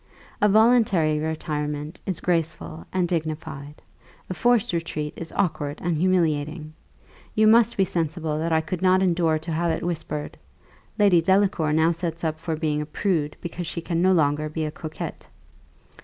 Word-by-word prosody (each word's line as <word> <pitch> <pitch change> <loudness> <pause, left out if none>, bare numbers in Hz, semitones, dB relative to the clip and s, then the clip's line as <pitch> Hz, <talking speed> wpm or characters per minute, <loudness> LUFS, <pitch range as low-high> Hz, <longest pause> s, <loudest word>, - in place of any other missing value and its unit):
A 210 - +5
voluntary 210 -8 +4
retirement 150 0 -3
is 185 -4 -3
graceful 155 - -2
and 185 -2 +1
dignified; 155 -3 -4 0.5
a - - 0
forced 240 0 +2
retreat 155 -3 -3
is 165 - -7
awkward 155 -6 -1
and 175 -1 -1
humiliating. 155 -3 0 0.6
You 215 - +4
must 230 +1 +5
be 195 - +4
sensible 160 -2 -2
that 165 +1 -1
I 160 0 +3
could 165 +2 -5
not 185 0 +4
endure 170 -3 +2
to 160 +2 -6
have 170 +2 0
it 160 - -1
whispered 160 -3 -4 0.6
'Lady 200 -5 +5
Delacour 190 -3 +2
now 160 +2 +4
sets 170 0 -4
up 155 -1 -1
for 165 0 -3
being 155 -1 -1
a - - -3
prude, 155 -3 -1
because 170 0 -5
she 170 - -4
can 170 -1 -1
no 185 +1 +4
longer 155 -3 +2
be 155 +1 -3
a 150 - -3
coquette. 155 0 -7
165 Hz, 165 wpm, -24 LUFS, 155-180 Hz, 0.6 s, A